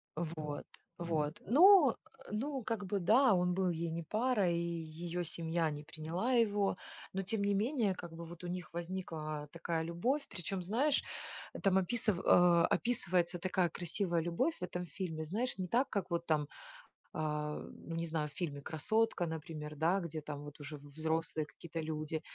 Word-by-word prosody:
Вот, 155 -3 -4 0.3
вот. 160 -3 -1
Ну 310 - +8 0.4
ну 265 +4 -2
как 215 -2 -2
бы, 200 +1 0
да, 225 +6 +6
он 180 0 +2
был 185 0 +2
ей 170 0 -1
не 165 +1 -3
парой, 210 -3 +2
и - - +1 0.2
ее 170 +2 -4
семья 165 0 0
не 150 0 -6
приняла 165 - -2
его. 205 -5 +3 0.4
Но, 195 - 0
тем 200 +2 -1
не 200 0 +2
менее 220 -1 +2
как 170 -2 -8
бы, 170 +1 -7
вот 170 +1 -10
у - - -4
них 175 -1 -5
возникла 165 -4 -4
такая 170 -1 -2
любовь. 240 - 0
Причем, 180 +2 -4
знаешь, 255 +11 +2 0.6
там 190 -1 +5
описыв 205 0 +1
а, 175 -1 +6
описывается 180 -7 +1
такая 185 -1 +1
красивая 175 +1 0
любовь 175 - +1
в - - -6
этом 180 0 -3
фильме. 160 0 -4
Знаешь, 220 +10 -1
не 185 -1 -2
так, 250 +7 +2
как 200 -4 -2
вот 170 0 0
там, 150 -3 +1 0.7
а, 150 -1 -1
ну, 165 - -8
не 165 0 -1
знаю 155 -2 -1
в - - -21
фильме 145 -5 -3
"Красотка", 210 +6 +1
например, 155 -1 -5
да, 170 +5 +3
где 160 -2 -4
там 145 -1 -6
вот 145 +1 -10
уже 145 +1 -7
в 145 0 -14
взрослые 160 0 -1
какие-то 165 +2 -7
люди 155 0 -2
175 Hz, 175 wpm, -35 LUFS, 160-200 Hz, 0.7 s, Ну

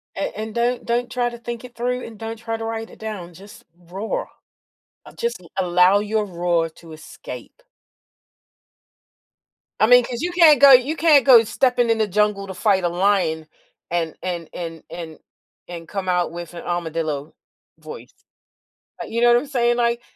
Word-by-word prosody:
And 195 - -2
and 215 +1 -6
don't 240 +1 0
don't 240 +1 -1
try 245 -1 -1
to 235 - -10
think 235 0 -7
it 245 - -12
through, 250 +1 -2
and 225 -2 -11
don't 225 +1 -6
try 225 0 -4
to 225 - -6
write 225 0 -5
it - - -15
down, 205 -6 -7
just 200 +4 -14
roar, 180 +5 -5 0.9
just 235 -4 -3 0.2
allow 180 +1 +4
your 210 +1 -1
roar 175 -3 -1
to 165 +1 -16
escape. 155 - -11 2.2
I - - +6
mean, 245 +1 +6
'cause 240 +2 -5
you 355 +1 -2
can't 325 -5 +6
go 280 -1 +9
you 260 +5 +4
can't 305 -6 +5
go 240 -4 +8
stepping 245 +1 +1
in 225 - +2
the 220 - +2
jungle 210 0 0
to 190 - -7
fight 190 0 +1
a - - +3
lion 175 -3 0 0.4
and 165 -2 -2
and 175 -3 -4
and 165 -2 -7
and 165 -2 -8 0.5
and 170 -2 -9
come 195 -2 -5
out 180 -2 0
with 175 0 -8
an 170 - -8
armadillo 160 -4 -3 0.4
voice, - - -11 0.9
you 235 - -3
know 240 - +5
what 240 - +6
I'm 290 - -5
saying, 240 -4 +1
like, 235 0 0
210 Hz, 175 wpm, -21 LUFS, 175-240 Hz, 2.2 s, go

